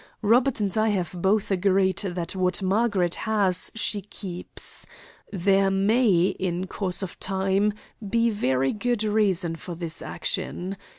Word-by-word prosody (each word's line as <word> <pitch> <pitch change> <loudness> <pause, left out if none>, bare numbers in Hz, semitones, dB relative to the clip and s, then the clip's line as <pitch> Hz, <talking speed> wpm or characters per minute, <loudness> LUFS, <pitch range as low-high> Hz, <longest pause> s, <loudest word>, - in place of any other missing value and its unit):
Robert 240 +4 +3
and 200 -3 -1
I 220 0 +2
have 185 -6 -1
both 200 +2 +1
agreed 190 0 +2
that 180 -3 -3
what 185 0 +1
Margaret 190 -3 +1 0.2
has 195 -4 +4
she 210 -2 -1
keeps. 185 -2 -6 0.4
There 195 +1 +2
may, 195 -2 +2
in 185 -1 -2
course 190 0 0
of 185 - -7
time, 195 +2 0 0.4
be 230 +2 +2
very 135 -10 0
good 235 +1 -1
reason 200 -6 +1
for 170 +1 -7
this 165 -1 -2
action. 185 +3 -2
195 Hz, 135 wpm, -25 LUFS, 180-210 Hz, 0.4 s, has